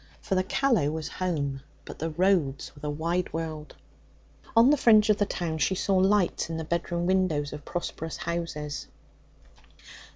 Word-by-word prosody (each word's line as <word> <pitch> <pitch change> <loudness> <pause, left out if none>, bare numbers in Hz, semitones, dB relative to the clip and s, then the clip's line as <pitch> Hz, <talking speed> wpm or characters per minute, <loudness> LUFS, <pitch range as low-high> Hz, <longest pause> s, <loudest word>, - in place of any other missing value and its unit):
For - - -4
the 185 0 +2
Callow 220 - +2
was 155 0 -4
home, 145 -7 -2 0.2
but - - -9
the 165 - -2
roads 170 -5 +1
were - - -14
the 150 - -4
wide 170 +4 -1
world. 155 -2 -5 0.8
On 235 +4 +7
the - - +6
fringe 220 -5 +5
of 210 - +2
the 205 - +1
town 160 -5 -3
she 190 +6 +2
saw 195 +1 0
lights 190 -3 +2
in 165 - -3
the 160 - -3
bedroom 170 +1 -2
windows 175 -6 +1
of 150 -1 -8
prosperous 165 -2 -4
houses. 165 -4 -4
170 Hz, 165 wpm, -27 LUFS, 155-190 Hz, 0.8 s, On